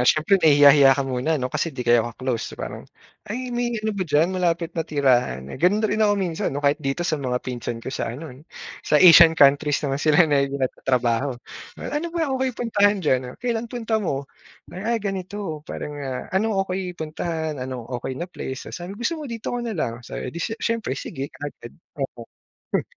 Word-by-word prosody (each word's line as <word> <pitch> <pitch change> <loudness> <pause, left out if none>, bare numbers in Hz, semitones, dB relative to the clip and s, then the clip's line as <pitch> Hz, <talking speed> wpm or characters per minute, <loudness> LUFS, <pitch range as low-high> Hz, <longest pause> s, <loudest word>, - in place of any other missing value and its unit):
ah, 125 - +3
siyempre 180 +5 +3
nahihiya-hiya 145 -2 +7
ka 140 - 0
muna 135 +4 0
no 125 -2 -3
kasi - - 0
'di 130 -5 -6
kayo 120 0 +5
ka-close. 125 -1 -4
Parang, - - -7 0.4
Ay, 250 +3 -4
may 240 -1 -1
ano 215 0 -2
ba 195 -2 -2
diyan, 150 +4 +3
malapit 170 -2 0
na 165 - -2
tirahan? 125 - +1
Eh, - - -8
ganun 205 +5 +3
na - - +2
rin 215 - 0
ako 210 -1 +4
minsan 175 -4 -1
no 145 +1 -4
kahit 145 +2 +3
dito 135 +4 -2
sa 155 -4 -1
mga 125 -2 -1
pinsan 120 -2 -4
ko 125 +3 -7
sa - - -2
ano, 135 +5 -7 0.5
sa - - +2
Asian 165 -1 +8
countries 145 +1 +4
naman 140 0 -1
sila 155 +2 +5
na 145 -3 +2
nagtatrabaho. 130 -1 0 0.4
Ano 300 +3 -3
ba 330 -4 -1
okay 260 0 0
puntahan 205 -5 +2
diyan? 130 -3 0
Kailan 235 -1 -2
punta 225 -3 -1
mo? 140 -7 -2 0.5
Ay, 220 +6 -1
ganito. 195 -5 -4
Para - - -5
ah, 135 -3 -5
ano, 205 +2 +1
Okeey 185 -1 -4
puntahan, 160 -2 -3
ano 125 -2 -5
okay 125 +2 -5
na 170 - -3
place 135 -7 -7
sa 175 0 -6
gusto 240 - -3
mo? 290 - -6
Dito 230 0 -5
ka 245 - -2
na 230 -4 -4
lang 115 -7 -1
sa 120 - -8
'di 150 +7 -5
s 225 +4 -2
siyempre, 230 -1 -2
sige 140 -3 -5
agad. 145 -5 -8 0.2
Oo. 125 -3 -4 0.5
Hmm. - - +2
160 Hz, 195 wpm, -23 LUFS, 135-205 Hz, 0.5 s, Asian